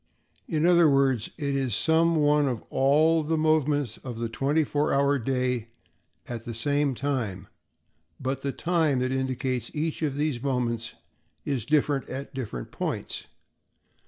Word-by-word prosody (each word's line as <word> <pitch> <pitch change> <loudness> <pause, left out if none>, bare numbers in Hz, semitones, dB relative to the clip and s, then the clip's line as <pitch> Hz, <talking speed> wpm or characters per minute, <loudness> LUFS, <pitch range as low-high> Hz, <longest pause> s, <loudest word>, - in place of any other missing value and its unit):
In 155 0 0
other 175 -2 +6
words, 135 -5 +2
it 140 -4 -1
is 130 -6 0
some 165 +5 +3
one 150 -1 +3
of 120 -4 -2
all 155 +4 +4
the 160 +1 -1
moments 150 -6 +1
of 125 -3 -7
the 115 0 -2
twenty 140 +7 +1
four 150 +1 0
hour 140 0 +3
day 125 -1 -1 0.6
at 120 -2 -5
the 115 -1 -6
same 145 +3 +1
time, 115 -9 -2 0.7
but 135 +1 -2
the 140 - -1
time 160 -3 +1
that 130 +1 0
indicates 130 -1 -1
each 155 +2 -2
of 145 -4 -1
these 145 -4 -1
moments 120 -4 -1 0.5
is 130 -6 -2
different 145 -2 +1
at 135 +2 -6
different 110 - -5
points. - - -4
140 Hz, 150 wpm, -26 LUFS, 125-150 Hz, 0.7 s, other